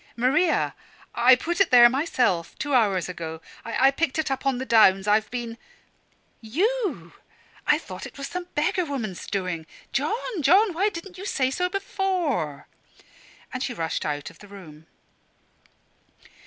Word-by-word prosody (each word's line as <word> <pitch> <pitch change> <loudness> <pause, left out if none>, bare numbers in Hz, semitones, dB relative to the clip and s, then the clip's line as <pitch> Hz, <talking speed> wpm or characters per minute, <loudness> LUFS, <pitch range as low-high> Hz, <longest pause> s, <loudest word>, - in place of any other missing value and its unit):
"Maria! 290 +8 +2 0.4
I 255 +2 +6
put 345 +8 -2
it 390 - +4
there 240 -1 +9
myself, 245 - 0
two 290 -1 -3
hours 205 -7 +2
ago. 165 -3 -6 0.2
I 260 +4 +3
picked 300 0 -1
it 315 -3 -1
up 270 +1 -2
on 265 -2 +1
the 260 - -4
downs. 200 -5 +5
I've 215 +1 +2
been 235 -2 -5 0.5
" - - -40 0.2
"You! 380 - 0 0.5
I - - +5
thought - - -8
it - - -15
was 275 - -5
some 360 0 -5
beggar 360 +5 +1
woman's 240 - -5
doing. 180 -5 -3 0.3
John, 385 - -2
John 375 +8 +4
why 390 +6 +1
didn't 360 0 -9
you 395 - -6
say 260 -6 0
so 360 +5 -1
before!" 360 - -2 0.9
And 255 - -4
she 250 -2 -3
rushed 165 -4 -2
out 145 -1 -4
of - - -21
the 205 - -14
room. 160 -6 -13
260 Hz, 155 wpm, -25 LUFS, -, 0.9 s, there